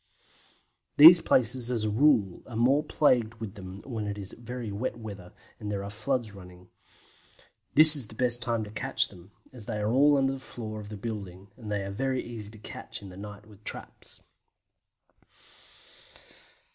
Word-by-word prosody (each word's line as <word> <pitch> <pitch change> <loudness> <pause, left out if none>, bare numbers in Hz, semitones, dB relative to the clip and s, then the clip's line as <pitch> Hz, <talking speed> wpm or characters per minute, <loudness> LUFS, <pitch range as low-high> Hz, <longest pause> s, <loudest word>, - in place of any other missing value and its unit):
These 165 +3 +10
places 125 0 +2
as 120 -3 -1
a - - 0
rule 110 -6 +2
are 120 - -9
more 130 +6 +3
plagued 125 -7 +1
with 110 -4 -7
them 95 -1 -10
when 110 -5 -4
it 105 0 -4
is 100 -1 -6
very 120 -2 -7
wet 110 +6 -4
weather 100 -6 -9 0.3
and 105 -1 -5
there 100 -1 -3
are 100 - -7
floods 115 +1 -2
running. 90 -2 -14 1.1
This 155 +1 +9
is 135 -7 +4
the 110 - -13
best 120 0 +1
time 115 -1 -1
to 105 - -9
catch 130 +5 -1
them, 90 0 -16 0.2
as 115 -5 -9
they 110 - -3
are 105 +1 -1
all 145 +3 +4
under 135 0 +1
the 135 - -7
floor 110 -4 -8
of 105 -1 -10
the 105 - -7
building, 100 -3 -7
and 110 -4 -9
are 100 -1 -3
very 130 +4 -2
easy 110 -4 -7
to 110 - -14
catch 105 -1 -9
in 100 - -9
the 90 - -12
night 105 +1 -10
with 105 -2 -17
the - - -32
traps. - - -8
110 Hz, 185 wpm, -28 LUFS, 100-125 Hz, 1.1 s, These